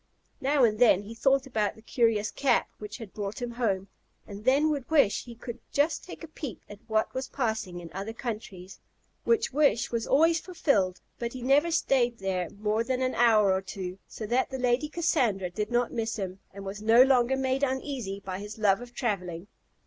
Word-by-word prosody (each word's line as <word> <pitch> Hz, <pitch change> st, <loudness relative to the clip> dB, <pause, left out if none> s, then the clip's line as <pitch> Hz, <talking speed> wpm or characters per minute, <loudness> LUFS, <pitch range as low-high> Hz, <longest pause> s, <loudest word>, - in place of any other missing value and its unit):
Now 275 Hz, 0 st, +3 dB
and 215 Hz, -2 st, +3 dB
then 220 Hz, -5 st, +5 dB
he 215 Hz, +3 st, -8 dB
thought 270 Hz, +3 st, +2 dB
about 220 Hz, -6 st, -1 dB
the 220 Hz, -, -17 dB
curious 225 Hz, -4 st, +1 dB
cap 275 Hz, -, +2 dB
which 210 Hz, 0 st, -7 dB
had 220 Hz, -5 st, -10 dB
brought 205 Hz, +1 st, -4 dB
him 245 Hz, -1 st, -4 dB
home, 205 Hz, -6 st, -1 dB, 0.4 s
and 205 Hz, +1 st, -10 dB
then 285 Hz, +4 st, +4 dB
would 280 Hz, -4 st, -3 dB
wish 280 Hz, -10 st, +3 dB
he 240 Hz, -1 st, -10 dB
could 240 Hz, 0 st, -8 dB
just 290 Hz, +2 st, +1 dB
take 360 Hz, -, -10 dB
a -, -, -6 dB
peep 290 Hz, -, -7 dB
at 205 Hz, -, -11 dB
what 220 Hz, 0 st, 0 dB
was 260 Hz, 0 st, -3 dB
passing 220 Hz, -8 st, -2 dB
in 170 Hz, -1 st, -10 dB
other 195 Hz, +4 st, -4 dB
countries; 210 Hz, -6 st, -7 dB, 0.5 s
which 460 Hz, -, +2 dB
wish 275 Hz, -6 st, +2 dB
was 230 Hz, -1 st, -2 dB
always 325 Hz, +4 st, +4 dB
fulfilled: 245 Hz, -, 0 dB, 0.2 s
but 235 Hz, 0 st, -3 dB
he 255 Hz, -2 st, -7 dB
never 285 Hz, +6 st, +4 dB
stayed 260 Hz, -7 st, +2 dB
there 185 Hz, -3 st, -2 dB
more 215 Hz, +2 st, -1 dB
than 260 Hz, +1 st, -1 dB
an 255 Hz, -, 0 dB
hour 215 Hz, -5 st, +4 dB
or 190 Hz, -, 0 dB
two, 190 Hz, -1 st, -6 dB
so 220 Hz, -, -7 dB
that 245 Hz, +5 st, +1 dB
the 265 Hz, -, -4 dB
Lady 250 Hz, +4 st, +1 dB
Cassandra 245 Hz, -, 0 dB
did 210 Hz, +3 st, -3 dB
not 240 Hz, 0 st, +1 dB
miss 225 Hz, -1 st, -2 dB
him, 190 Hz, -3 st, -5 dB
and 200 Hz, 0 st, -9 dB
was 195 Hz, +2 st, -6 dB
no 225 Hz, +3 st, +7 dB
longer 265 Hz, -1 st, +3 dB
made 265 Hz, 0 st, 0 dB
uneasy 260 Hz, -7 st, -2 dB
by 190 Hz, -1 st, -5 dB
his 205 Hz, +2 st, -8 dB
love 205 Hz, 0 st, +3 dB
of 245 Hz, 0 st, -11 dB
travelling. 180 Hz, -7 st, -2 dB
230 Hz, 200 wpm, -28 LUFS, 200-265 Hz, 0.5 s, no